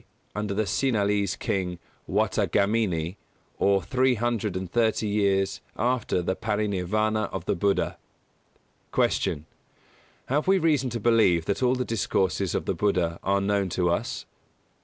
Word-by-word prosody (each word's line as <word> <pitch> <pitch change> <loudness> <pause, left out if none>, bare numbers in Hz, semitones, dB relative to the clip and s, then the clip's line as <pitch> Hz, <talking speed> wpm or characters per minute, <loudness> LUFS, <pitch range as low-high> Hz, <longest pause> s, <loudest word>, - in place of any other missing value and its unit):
under 105 -1 -3
the 110 - +1
Sinhalese 100 -4 +1
King, 90 -3 -2 0.3
Wattagamini, 100 -4 +1 0.4
or 100 -2 +3
three 130 +6 +2
hundred 110 -4 -1
and 95 -2 -5
thirty 115 -2 +1
years 100 -2 +1 0.2
after 120 -7 0
the 95 - -1
Paranirvāna 105 +1 0
of 95 -2 -5
the - - +1
Buddha. 100 +3 0 1.0
167. 75 +1 +1 0.8
Q. 135 - 0
_Have 150 - 0
we 195 0 +5
reason 150 -7 +2
to 120 0 -3
believe 105 -7 +3
that 100 - -1
all 125 0 +3
the 125 0 -2
discourses 95 -4 0
of - - -1
the - - 0
Buddha 90 -5 0
are 100 +1 +1
known 100 -1 +1
to 90 0 +1
us? 85 - -2
100 Hz, 140 wpm, -26 LUFS, 95-115 Hz, 1.0 s, we